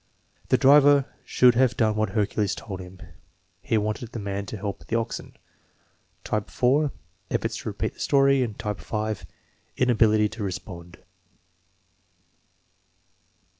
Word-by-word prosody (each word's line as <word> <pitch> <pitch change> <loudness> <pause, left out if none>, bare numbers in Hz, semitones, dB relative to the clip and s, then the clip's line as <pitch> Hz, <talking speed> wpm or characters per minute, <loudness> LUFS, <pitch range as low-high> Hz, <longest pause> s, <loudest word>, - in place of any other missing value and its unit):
"The - - +4
driver 140 0 +6 0.2
should 125 -1 +4
have 125 0 +2
done 110 -2 +2
what 110 -1 0
Hercules 105 -1 0
told 95 -4 -7
him." 90 0 -11 0.6
"He 115 +1 0
wanted 110 +2 -3
the 115 - -4
man 100 -1 -4
to 110 - -6
help 100 0 -6
the 115 - -1
oxen." 115 - -5 0.9
Type 105 -2 -2
(4): 140 +4 +2 0.4
Efforts - - -2
to - - -5
repeat - - -3
the - - -22
story. 135 -2 +3
Type 105 -1 -4
(5): 110 -1 -4 0.5
Inability 110 -4 +3
to 110 0 -6
respond. 90 -2 -7
110 Hz, 130 wpm, -25 LUFS, 100-125 Hz, 0.9 s, driver